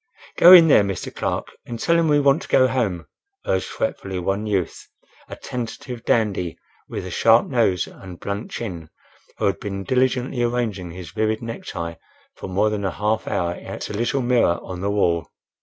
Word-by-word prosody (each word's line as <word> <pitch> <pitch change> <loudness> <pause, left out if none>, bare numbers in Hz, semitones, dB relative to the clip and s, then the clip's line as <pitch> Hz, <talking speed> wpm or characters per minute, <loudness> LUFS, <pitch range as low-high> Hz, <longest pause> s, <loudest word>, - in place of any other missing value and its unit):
"Go 175 - +8
in 175 -3 +10
there, 145 - +6
Mr. 100 -3 -4
Clark, - - -2
and 120 -1 -7
tell 170 - +2
him 165 -1 +3
we 145 -1 +4
want 140 +1 +3
to - - -9
go 130 - +4
home," 105 -10 -1 0.4
urged - - 0
fretfully 95 - -3
one 95 +4 -2
youth, 95 -5 -2 0.4
a - - -6
tentative 120 0 -6
dandy, 100 -7 0 0.3
with - - -5
a - - -6
sharp 115 +1 +4
nose 105 - +1
and 90 -2 -12
blunt 100 +2 -4
chin, 85 -9 -6 0.5
who 110 - -1
had 100 -1 +1
been 100 -1 -5
diligently 130 +2 0
arranging 115 -7 -1
his 85 0 -9
vivid 110 +1 -1
necktie 85 -7 -5 0.4
for - - -8
more 105 +3 +1
than 105 -1 -3
a 95 - 0
half 105 +4 -1
hour 85 0 0
at - - -7
a - - -5
little 120 +5 0
mirror 120 -8 +3
on 90 -1 -7
the 100 - -1
wall. 85 -5 +1
105 Hz, 185 wpm, -22 LUFS, 95-125 Hz, 0.5 s, in